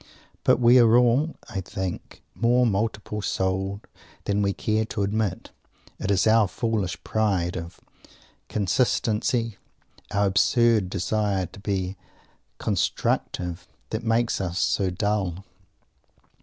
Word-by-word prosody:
But - - +4
we 120 +1 +6
are 115 0 +6
all, 125 +6 +3
I 95 - -4
think, 95 0 -6
more 120 +2 +3
multiple 105 0 -1
souled 95 +1 -1 0.4
than 100 0 0
we 100 -1 +2
care 110 +2 0
to 110 -2 -3
admit. 105 -1 -2 0.5
It - - -3
is 95 -3 +3
our 110 -1 +5
foolish 100 -5 -2
pride 95 -5 0
of 85 -1 -7 0.7
consistency, 115 +1 0 0.5
our 100 0 +1
absurd 110 +1 +3
desire 100 +1 0
to 95 - -13
be 95 -2 -2 0.6
"constructive," 90 0 -1 0.2
that 110 +1 -3
makes 115 -1 +1
us 90 -2 -3
so 100 -1 +1
dull. 95 -1 -2
100 Hz, 115 wpm, -25 LUFS, 95-115 Hz, 0.7 s, we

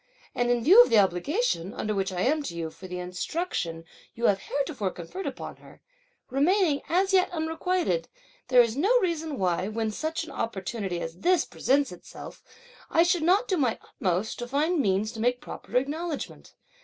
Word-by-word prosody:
And 245 0 0
in 240 -1 +2
view 385 - +9
of - - +4
the 225 - +4
obligation, 195 - +1
under 215 - -2
which 195 -1 -1
I 180 -1 -2
am 300 +8 +2
to 170 - -5
you 165 -1 -4
for 185 - -11
the 180 0 -5
instruction 180 - -3 0.3
you 235 - -2
have 195 -3 +4
heretofore 275 -7 -2
conferred 180 - -7
upon - - -6
her, - - -17 0.5
remaining 305 +2 +2
as 380 +3 +2
yet 370 -1 +4
unrequited, 350 +7 -1 0.4
there 250 -2 +7
is 230 -1 -2
no 410 - +3
reason 320 - -2
why, 185 -1 0
when 220 0 -2
such 315 +8 -3
an 325 - -9
opportunity 195 -4 -3
as 165 +2 -6
this 355 - +3
presents 280 0 +1
itself, 180 - -11 0.5
I 330 - +4
should 350 -1 +2
not 380 +9 +3
do 375 - +1
my 255 -7 +1
utmost 185 +3 -2
to 240 - -4
find 305 +6 +1
means 205 -2 +1
to 230 - -9
make 245 +2 +1
proper - - -4
acknowledgment. 300 +4 -4
255 Hz, 180 wpm, -27 LUFS, -, 0.5 s, view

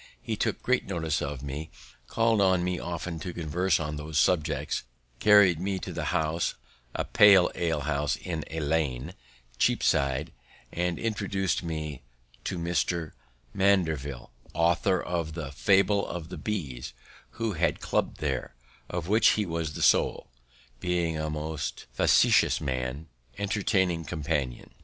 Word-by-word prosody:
He - - -3
took - - -2
great - - +1
notice 80 -5 -1
of 70 -2 -4
me, 75 +3 -5 0.4
called 115 -2 +2
on 95 -2 +3
me 90 0 -1
often 85 -1 -4
to 90 +4 -5
converse 85 +2 0
on 75 -1 -3
those 75 0 -4
subjects, 75 -4 +1 0.4
carried 100 -6 +6
me 95 +1 -1
to - - -6
the - - -3
Horns, 80 +2 0 0.4
a - - -1
pale 100 -3 +6
alehouse 75 -3 0
in 80 -4 -4
Lane, 75 -2 -1 0.5
Cheapside, 70 -2 +2 0.4
and 90 0 -1
introduced 100 -4 -1
me 80 -5 -4 0.4
to 90 - -2
Dr. 85 -1 -1 0.4
Mandeville, 80 -11 +1 0.2
author 85 +3 +2
of 85 -3 -3
the 75 -5 -5
"Fable 95 +10 +3
of 85 -2 -6
the - - -7
Bees," 75 - -4 0.4
who 115 -2 -2
had 80 - +1
a - - -15
club - - -1
there, 65 -4 -3 0.3
of 85 -2 -3
which 110 +4 +5
he 105 - 0
was 80 -3 -3
the - - -3
soul, - - +2 0.5
being 85 -2 0
a 80 0 -2
most 75 0 -4
facetious, - - +4 0.8
entertaining 95 -4 0
companion. 75 -4 -3
85 Hz, 135 wpm, -28 LUFS, 75-95 Hz, 0.8 s, carried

